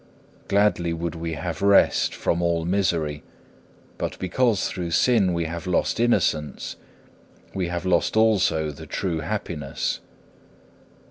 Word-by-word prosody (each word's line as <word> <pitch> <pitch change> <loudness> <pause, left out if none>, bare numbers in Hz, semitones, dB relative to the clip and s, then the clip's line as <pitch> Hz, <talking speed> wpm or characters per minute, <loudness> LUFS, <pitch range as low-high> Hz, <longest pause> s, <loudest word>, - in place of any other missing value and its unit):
Gladly 100 -4 +2
would 85 0 -3
we 85 -1 -4
have 80 0 -4
rest 100 0 +4
from 85 - 0
all 85 -1 0
misery; 85 -5 0 0.8
but - - -3
because 105 +3 +1
through 90 -2 -4
sin 100 +1 +3
we 85 -1 -1
have 85 +3 -5
lost 90 +4 0
innocence, 80 -10 0 0.8
we 95 -3 -1
have 85 +1 -4
lost 95 +3 +1
also 95 -8 +3
the 70 - -11
true 85 -4 -2
happiness. 80 -5 -3
85 Hz, 125 wpm, -24 LUFS, 80-100 Hz, 0.8 s, rest